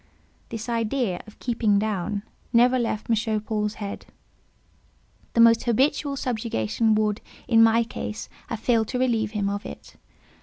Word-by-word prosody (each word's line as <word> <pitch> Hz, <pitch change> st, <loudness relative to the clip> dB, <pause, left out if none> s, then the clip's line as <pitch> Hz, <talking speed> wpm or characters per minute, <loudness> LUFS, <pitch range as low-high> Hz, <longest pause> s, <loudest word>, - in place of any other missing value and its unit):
This 225 Hz, 0 st, -6 dB
idea 230 Hz, -4 st, -1 dB
of 215 Hz, -, -14 dB
"keeping 225 Hz, -4 st, +1 dB
down" 205 Hz, -1 st, -1 dB, 0.3 s
never 250 Hz, +2 st, +4 dB
left 225 Hz, -3 st, -2 dB
M. 220 Hz, -1 st, +1 dB
Paul's 210 Hz, -1 st, -2 dB
head; 200 Hz, -2 st, -6 dB, 1.3 s
the -, -, 0 dB
most 230 Hz, 0 st, +6 dB
habitual 275 Hz, +4 st, +1 dB
subjugation 225 Hz, -, 0 dB
would, 215 Hz, -1 st, 0 dB, 0.3 s
in 230 Hz, -2 st, +5 dB
my 225 Hz, +1 st, +5 dB
case, 220 Hz, -1 st, -6 dB, 0.2 s
have 230 Hz, -, -4 dB
failed 225 Hz, -1 st, +2 dB
to 250 Hz, -, -3 dB
relieve 225 Hz, -4 st, 0 dB
him 205 Hz, -2 st, -1 dB
of 200 Hz, +1 st, -2 dB
it. -, -, -10 dB
225 Hz, 145 wpm, -25 LUFS, 210-235 Hz, 1.3 s, most